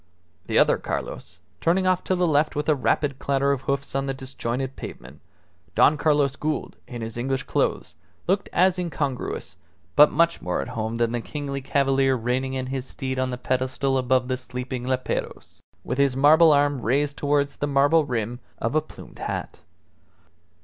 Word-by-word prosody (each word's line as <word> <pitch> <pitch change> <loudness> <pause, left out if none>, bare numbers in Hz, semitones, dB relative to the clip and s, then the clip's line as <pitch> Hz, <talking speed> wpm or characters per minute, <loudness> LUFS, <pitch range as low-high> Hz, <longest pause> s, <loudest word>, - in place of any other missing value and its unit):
The - - 0
other - - +4
Carlos, - - -5 0.2
turning 185 +3 +2
off 185 -1 +2
to 185 - +1
the 180 0 +2
left 150 -1 +2
with 150 +1 -2
a 155 - +5
rapid 140 0 0
clatter 140 0 +1
of 140 -2 -1
hoofs 140 +1 -2
on 135 0 -1
the 135 - -2
disjointed 130 0 -4
pavement 65 +4 -10 0.5
Don 155 - +5
Carlos 145 -3 +2
Gould, 155 +1 -3
in 120 -3 -6
his 115 +1 -6
English 130 +2 -1
clothes, - - -1 0.3
looked 195 +2 0
as 185 0 +3
incongruous, 145 -7 -3 0.4
but 150 0 +7
much 170 +1 +2
more 90 - -2
at 70 - -4
home 110 +1 -3
than 115 -1 +1
the 120 -1 -2
kingly 140 +1 -5
cavalier 135 -1 +2
reining 130 +2 -1
in 130 -1 -2
his 130 0 -4
steed 130 -1 -4
on 130 0 0
the 125 - -4
pedestal 130 +2 -1
above 130 0 +2
the 130 0 -1
sleeping 125 0 -5
leperos, 130 0 -3 0.2
with 125 +3 -3
his 140 -2 +3
marble 155 +4 +7
arm 145 -2 +2
raised 140 +5 +1
towards 145 0 0
the 145 - -1
marble 145 +3 +4
rim 120 -3 -3 0.2
of 115 - -2
a 155 - +3
plumed 155 - -14
hat. - - -4
135 Hz, 175 wpm, -24 LUFS, 130-145 Hz, 0.5 s, but